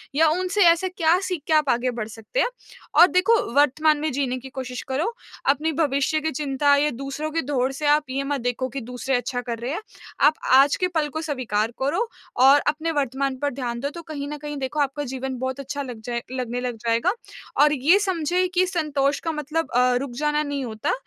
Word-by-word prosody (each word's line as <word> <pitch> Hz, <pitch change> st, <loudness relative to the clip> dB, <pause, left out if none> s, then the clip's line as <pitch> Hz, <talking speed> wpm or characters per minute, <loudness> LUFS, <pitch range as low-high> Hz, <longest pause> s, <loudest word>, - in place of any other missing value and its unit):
या 320 Hz, +2 st, +5 dB
उनसे 370 Hz, +5 st, 0 dB
ऐसा 340 Hz, +3 st, +2 dB
क्या 330 Hz, +1 st, +4 dB
सीख 360 Hz, -5 st, -3 dB
के 320 Hz, -, +2 dB
आप 305 Hz, -3 st, +3 dB
आगे 245 Hz, +1 st, +1 dB
बढ़ 215 Hz, -, -3 dB
सकते 225 Hz, -, -5 dB
हैं। -, -, +3 dB, 0.5 s
और 355 Hz, -, +10 dB
देखो 370 Hz, +6 st, +4 dB, 0.2 s
वर्तमान 295 Hz, +2 st, +4 dB
में 310 Hz, 0 st, -1 dB
जीने 255 Hz, -1 st, -1 dB
की 265 Hz, +1 st, -10 dB
कोशिश 255 Hz, -2 st, -6 dB
करो, 305 Hz, -, -1 dB, 0.4 s
अपने 305 Hz, +3 st, +2 dB
भविष्य 290 Hz, 0 st, +1 dB
की 315 Hz, 0 st, -1 dB
चिंता 285 Hz, 0 st, +2 dB
या 295 Hz, +1 st, +2 dB
दूसरों 275 Hz, +3 st, -4 dB
की 330 Hz, -, 0 dB
दौड़ 265 Hz, -2 st, 0 dB
से 295 Hz, +2 st, -5 dB
आप 300 Hz, +1 st, +4 dB
ये 275 Hz, +1 st, -2 dB
मत 280 Hz, -1 st, -2 dB
देखो 245 Hz, +1 st, -2 dB
कि 270 Hz, +1 st, -5 dB
दूसरे 250 Hz, +2 st, -2 dB
अच्छा 245 Hz, 0 st, -2 dB
कर 235 Hz, -2 st, -4 dB
रहे 245 Hz, +4 st, -3 dB
हैं। 340 Hz, -, -3 dB, 0.5 s
आप 305 Hz, -, +4 dB, 0.2 s
आज 275 Hz, +2 st, +6 dB
के 365 Hz, -, 0 dB
पल 300 Hz, -1 st, +1 dB
को 315 Hz, -, -1 dB
स्वीकार 240 Hz, -7 st, -1 dB
करो 335 Hz, -, 0 dB, 0.4 s
और 280 Hz, +2 st, +8 dB
अपने 315 Hz, +2 st, 0 dB
वर्तमान 275 Hz, -2 st, -1 dB
पर 285 Hz, -1 st, -1 dB
ध्यान 240 Hz, -2 st, -4 dB
दो 280 Hz, +3 st, -2 dB
तो 340 Hz, -, -6 dB
कहीं 285 Hz, -1 st, -4 dB
न 295 Hz, +1 st, -5 dB
कहीं 295 Hz, 0 st, -6 dB
देखो 270 Hz, +3 st, -3 dB
आपका 285 Hz, 0 st, 0 dB
जीवन 260 Hz, 0 st, -4 dB
बहुत 260 Hz, +1 st, -3 dB
अच्छा 280 Hz, +1 st, -4 dB
लग 245 Hz, -5 st, -7 dB
जाए 240 Hz, -1 st, -2 dB
लगने 245 Hz, -1 st, -3 dB
लग 245 Hz, -2 st, -3 dB
जाएगा 230 Hz, +11 st, +2 dB, 0.5 s
और 300 Hz, 0 st, +6 dB
ये 310 Hz, +9 st, +4 dB
समझे 365 Hz, -2 st, 0 dB
कि 365 Hz, 0 st, +3 dB
संतोष 295 Hz, -5 st, 0 dB
का 330 Hz, -, -2 dB
मतलब 310 Hz, +2 st, -3 dB
अ, 250 Hz, 0 st, +4 dB
रुक 260 Hz, 0 st, -2 dB
जाना 300 Hz, 0 st, +1 dB
नहीं 285 Hz, -2 st, -3 dB
होता 220 Hz, -2 st, -2 dB
280 Hz, 220 wpm, -23 LUFS, 255-310 Hz, 0.5 s, और